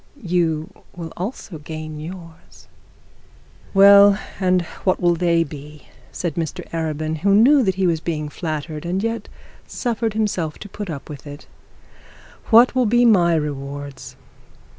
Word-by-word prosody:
You 165 -3 0 0.2
will 165 -2 -7
also 185 -3 -6
gain 155 0 -7
yours.' 165 0 -11 1.0
'Well, 200 0 +7 0.2
and 185 -2 +2 0.2
what 185 - +1
will 175 -1 +3
they 170 -1 +2
be?' 150 -1 -11 0.3
said 175 -4 -3
Mr 160 -1 -4
Arabin, 155 -1 -2
who 195 +4 +3
knew 270 +7 +6
that 190 -6 +1
he 190 0 0
was 165 -2 +1
being 155 -2 -3
flattered, 155 0 -5
and 180 +3 -2
yet 230 0 -3 0.4
suffered 230 -3 -2
himself 185 -8 -1
to 205 - -10
put 205 -1 -7
up 145 -4 -6
with 145 -1 -10
it. 145 +1 -10 1.0
'What 235 +2 +6
will 255 -3 +2
be 240 +3 +3
my 175 -7 +4
rewards?' 140 -2 -5
170 Hz, 140 wpm, -21 LUFS, 155-200 Hz, 1.0 s, Well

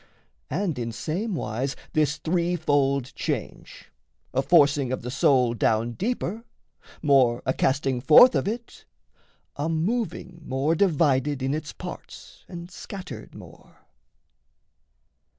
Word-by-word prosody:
And 165 -3 -2
in 115 -1 -3
same 175 - -3
wise, 130 +1 -3 0.2
This 150 -1 +1
three 175 +1 0
fold 140 -5 0
change: - - -5 0.4
a 130 - +2
forcing 140 -3 +3
of 130 - -3
the 125 - -5
soul 130 -3 +3
Down 115 0 +1
deeper, 220 - -3 0.6
more 130 -5 +3
a 130 - +1
casting 135 -2 0
forth 160 - +8
of - - 0
it, 230 +3 -6 0.7
A 145 +3 -1
moving 180 0 -2
more 135 +3 0
divided 145 -6 +1
in 135 +1 0
its 155 0 -4
parts - - -10
And 175 +1 -9
scattered 185 +1 -9
more. - - -15
145 Hz, 120 wpm, -25 LUFS, 130-175 Hz, 0.7 s, forth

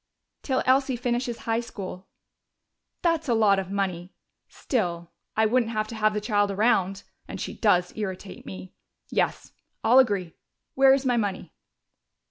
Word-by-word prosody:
"Till 260 -2 0
Elsie 265 0 +3
finishes 240 0 -2
high 225 0 +1
school." 195 -5 -7 1.0
"That's 330 -4 +1
a 235 - +3
lot 205 -3 +4
of 190 -1 -5
money.... 190 -2 -2 0.4
Still, 175 - -3 0.3
I 220 - +4
wouldn't 230 +1 +2
have 215 0 -1
to 230 - -6
have 215 -1 +1
the - - +1
child 205 -1 +1
around. 195 -2 +1 0.2
And - - -7
she - - -4
does 180 -5 +2
irritate 195 -2 -6
me.... 95 -1 -9 0.4
Yes, - - -1 0.3
I'll 240 +4 +6
agree. 200 -9 +1 0.4
Where 270 0 +6
is 270 0 -3
my 245 -2 +2
money?" 195 -6 -3
215 Hz, 150 wpm, -26 LUFS, 190-245 Hz, 1.0 s, I'll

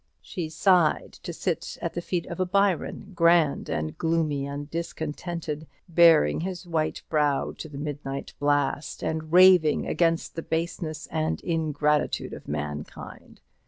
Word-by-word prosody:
She 165 -3 -5
sighed 170 0 +2
to - - -5
sit - - -3
at - - -3
the 175 - -3
feet 175 0 -2
of 170 - -7
a 185 - +2
Byron, 195 0 0
grand 170 -3 +3
and 75 0 -2
gloomy 155 -4 0
and 145 +1 -5
discontented, 160 -1 -4 0.2
baring 165 - +5
his 180 0 -5
white 160 -2 -1
brow 150 -3 +1
to 160 - -6
the 145 - -9
midnight 145 -2 -5
blast, 145 0 0
and 160 0 -3
raving 180 -3 +6
against 165 -1 +1
the 165 - -4
baseness 160 -1 -3
and 155 0 -1
ingratitude 150 -3 0
of - - -10
mankind. 75 0 -6
160 Hz, 140 wpm, -26 LUFS, 145-170 Hz, 0.2 s, raving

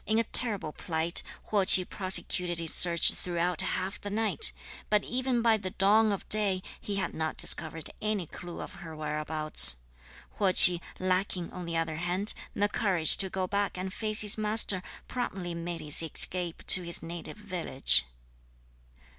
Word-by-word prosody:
In 220 - 0
a 230 - +1
terrible 210 -8 0
plight, 165 0 -3 0.3
Huo 205 -2 +1
Ch'i 185 -1 +8
prosecuted 180 -2 -1
his 165 -1 -2
search 170 -2 +4
throughout 175 -1 -3
half 185 +2 -5
the 205 - -7
night; 220 - 0 0.4
but 210 -1 +1
even 250 -1 -3
by 225 -2 +2
the 190 -3 -7
dawn 210 +4 +1
of 200 - -6
day, 200 -3 +1 0.2
he 205 - -6
had 185 -4 -4
not 160 -1 -5
discovered 160 -1 -1
any 210 -4 -3
clue 175 +2 -11
of - - -10
her 165 -2 -10
whereabouts. 150 - +2 0.6
Huo 195 -3 +1
Ch'i, 175 -1 +9 0.2
lacking, 185 -1 -3
on 180 -2 -9
the 165 -1 -4
other 160 -1 -4
hand, 180 +5 -3 0.2
the 205 - 0
courage 185 -7 +3
to 190 - +1
go 185 0 -4
back 200 0 -3
and 185 +1 -6
face 215 -1 0
his 210 0 +1
master, 210 -3 +1 0.3
promptly 190 -8 -6
made 170 0 -7
his 150 0 +4
escape 170 +1 -1
to 185 - +8
his 170 -1 -4
native 170 +4 -7
village. 175 - +1
185 Hz, 165 wpm, -27 LUFS, 170-205 Hz, 0.6 s, Ch'i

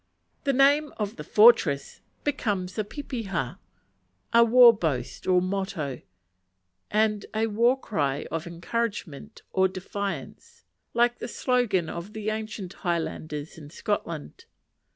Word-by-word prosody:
The 275 - +3
name 285 +3 +4
of 210 -1 -3
the 150 - -6
fortress 180 -7 +4 0.2
becomes 205 -10 -2
a - - +2
pepeha, 205 - -4 0.7
a 235 0 +8
war 240 +1 +8
boast 150 - -3
or 180 -1 +4
motto, 185 -8 -3 0.9
and 210 -1 +1
a 220 +1 +2
war 235 +4 +2
cry 145 - -1
of 165 +1 -3
encouragement 200 +1 -4
or 190 0 +4
defiance; 195 - -6 0.3
like 240 +1 +3
the - - -4
slogan 240 -9 +1
of 170 +6 -7
the 215 0 -2
ancient 215 -4 -5
Highlanders 160 -4 -3
in 145 -2 -11
Scotland. 165 -3 -4
200 Hz, 120 wpm, -26 LUFS, 170-230 Hz, 0.9 s, a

